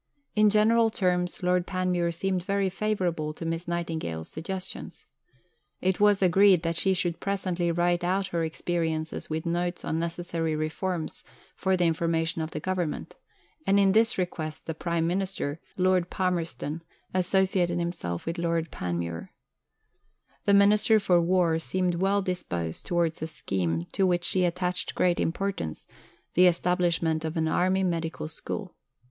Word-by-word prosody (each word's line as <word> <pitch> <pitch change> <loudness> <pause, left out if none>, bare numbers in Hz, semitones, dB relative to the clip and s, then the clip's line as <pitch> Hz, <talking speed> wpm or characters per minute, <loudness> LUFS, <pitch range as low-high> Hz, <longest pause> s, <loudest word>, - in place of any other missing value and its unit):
In 210 0 +5
general 225 +2 +4
terms, 180 -4 0
Lord 180 0 +2
Panmure 180 -2 0
seemed 185 +1 -1
very 195 +1 +1
favourable 180 -7 -1
to 165 - -7
Miss 165 +1 -3
Nightingale's 160 - -3
suggestions. 185 +4 -6 0.7
It 185 0 0
was 205 -1 +4
agreed 185 0 +5
that 165 0 -1
she 190 +3 +2
should 175 -2 -1
presently 185 -3 -1
write 175 +1 +1
out 190 +2 0
her 170 -1 -1
experiences 160 -1 -2
with 160 +1 -3
notes 175 +1 -1
on 160 - -1
necessary 165 -1 -2
reforms 160 +2 -3 0.3
for 190 -1 +1
the 175 - +2
information 165 0 0
of 155 - -3
the 155 - -5
Government, 180 -2 -3 0.5
and 200 +1 +5
in 195 -1 +5
this 225 +3 +3
request 160 -4 -3
the 160 - -3
Prime 170 +1 -1
Minister, 180 -4 -2 0.2
Lord 185 -1 +2
Palmerston, 170 -4 -2 0.3
associated 185 -1 +2
himself 170 - -3
with 165 +1 -3
Lord 165 -1 -1
Panmure. 85 -1 -4 1.2
The 200 - +5
Minister 210 +2 +5
for 180 -4 +3
War 170 -2 +2
seemed 180 +1 0
well 195 +3 +1
disposed 85 - -3
towards 170 -2 0
a 160 - -2
scheme 85 - -2
to 190 - +2
which 175 -1 +1
she 180 +1 +3
attached 180 +1 -2
great 175 -1 +2
importance 165 - -2 0.5
the 180 +1 +6
establishment 170 -2 +1
of 160 +1 -3
an 160 0 +1
Army 185 +4 +2
Medical 165 -3 -2
School. 155 - -5
175 Hz, 145 wpm, -27 LUFS, 165-185 Hz, 1.2 s, the